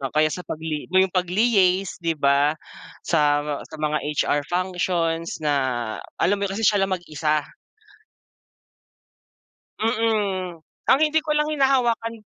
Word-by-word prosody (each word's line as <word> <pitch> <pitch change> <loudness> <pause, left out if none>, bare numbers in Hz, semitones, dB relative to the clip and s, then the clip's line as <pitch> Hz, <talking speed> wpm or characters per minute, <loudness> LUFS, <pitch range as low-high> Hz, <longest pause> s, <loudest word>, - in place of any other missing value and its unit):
O 135 - -2
kaya 155 0 +3
sa 180 - -5
pagli 155 -1 -4
mo 185 - -2
yung 190 -1 +4
pagli-yace 190 0 +2
'di 165 -1 -1
ba 140 +2 +2 0.5
sa, 145 -2 +2 0.2
sa 155 - -9
mga 150 0 -1 0.2
HR 145 - +1
functions 175 -2 -1
na 150 - +2 0.6
alam 200 +4 +1
mo 200 - 0
yun - - -4
kasi 225 - -2
siya 205 -1 +4
lang 190 -1 -1
mag-isa. 155 -3 -1 2.3
Mm. 210 -6 0 0.3
Ang 270 - +6
hindi 310 +1 +3
ko 310 - -5
lang 300 0 +2
hinahawakan 260 -6 +1
180 Hz, 135 wpm, -23 LUFS, 155-215 Hz, 2.3 s, Ang